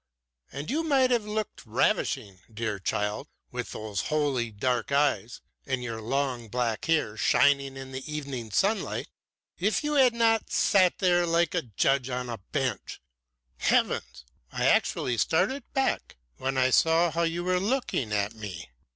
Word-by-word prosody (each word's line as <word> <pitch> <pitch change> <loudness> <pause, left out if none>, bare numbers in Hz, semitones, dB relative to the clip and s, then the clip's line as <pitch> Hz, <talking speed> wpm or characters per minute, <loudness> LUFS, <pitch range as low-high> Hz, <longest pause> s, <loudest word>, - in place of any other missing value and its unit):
And 140 - -5
you 310 +4 +1
might 275 -5 +3
have 235 -4 +2
looked 215 0 -4
ravishing, 110 -2 0
dear 110 -2 -3
child, 105 +2 -2 0.2
with - - -5
those 105 -4 -4
holy 145 -6 0
dark 120 +4 -1
eyes, 135 -5 +1 0.3
and 130 -2 -1
your 115 -2 -5
long 125 0 -1
black 115 -1 -1
hair 155 -10 +1
shining 135 +4 +3
in 135 0 -8
the 130 0 -6
evening 140 -6 -5
sunlight 200 - 0 0.5
if 210 - +1
you 300 0 -1
had 260 -4 +5
not 225 -1 +2
sat 185 -3 +3
there 175 -2 +3
like 170 -1 +2
a - - +1 0.2
judge 135 -1 +2
on 125 0 -2
the 120 -2 -5
bench. 130 -7 -2 0.6
Heavens! 60 0 0 0.3
I - - -1
actually 120 -2 +2
started 210 - 0
back 270 - -1 0.2
when 135 0 -2
I 130 0 +3
saw 165 +4 +4
how 170 - -1
you 170 +1 0
were 180 0 +1
looking 205 - -1
at 105 +1 0
me. 100 - -8
135 Hz, 155 wpm, -27 LUFS, 115-180 Hz, 0.6 s, had